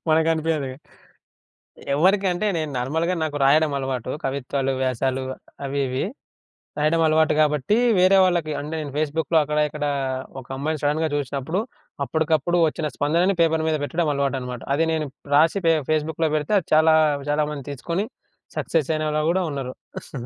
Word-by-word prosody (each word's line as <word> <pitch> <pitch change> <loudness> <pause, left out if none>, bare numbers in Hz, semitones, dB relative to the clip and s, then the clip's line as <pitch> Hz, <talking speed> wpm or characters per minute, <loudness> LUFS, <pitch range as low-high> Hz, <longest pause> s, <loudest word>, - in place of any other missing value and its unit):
మనకు 160 +1 +3
అనిపియదిగ. 155 -4 -1 1.2
ఎవరికంటే 190 +4 +2
నేను 155 -2 -3
నార్మల్‌గా 160 +8 0
నాకు 150 -2 -3
రాయడం 150 +2 +4
అలవాటు 130 -2 -3
కవిత్వాలు, 135 0 -1
వ్యాసాలు 130 +1 0 0.4
అవి 140 +1 -2
ఇవి. 130 +1 -1 0.8
రాయడం 155 +2 +2
అలవాటు 155 0 +3
గాబట్టి 150 - +2 0.2
వేరే 185 +2 +5
వాళ్ళకి 175 -4 0
అంటే 150 +2 -5
నేను 145 - -6
ఫేస్‌బుక్‌లో 155 +1 0
అక్కడ 150 +1 -1
ఇక్కడ 150 0 -4 0.6
ఒక 125 - -18
అమ్మాయిని 155 +2 -2
సడెన్‌గా 150 +2 +1
జూశినప్పుడు 145 +5 -2 0.5
అప్పటికప్పుడు 160 +3 +1
ఒచ్చిన 155 0 -2
స్పందనను 170 +6 +2
పేపరు 160 -1 +2
మీద 155 - +1
బెట్టడం 165 +3 -1
అలవాటనమాట. 130 -3 -2
అది 165 +3 +2
నేను 155 -2 -1 0.3
రాసి 165 +6 +4
ఫే 165 - +6 0.2
ఫేస్‌బుక్‌లో 155 +1 0
బెడితే 150 +7 0
అది 170 - -12
చాలా 160 0 +5 0.4
చాలా 150 +1 +2
మందిని 145 -3 -7
తీసుకొని 170 +8 -3 0.5
సక్సెస్ 160 -3 0
అయినవాళ్ళు 155 0 0
గూడా 185 +1 +1
ఉన్నారు. 130 -2 -8
155 Hz, 140 wpm, -23 LUFS, 140-160 Hz, 1.2 s, ఫే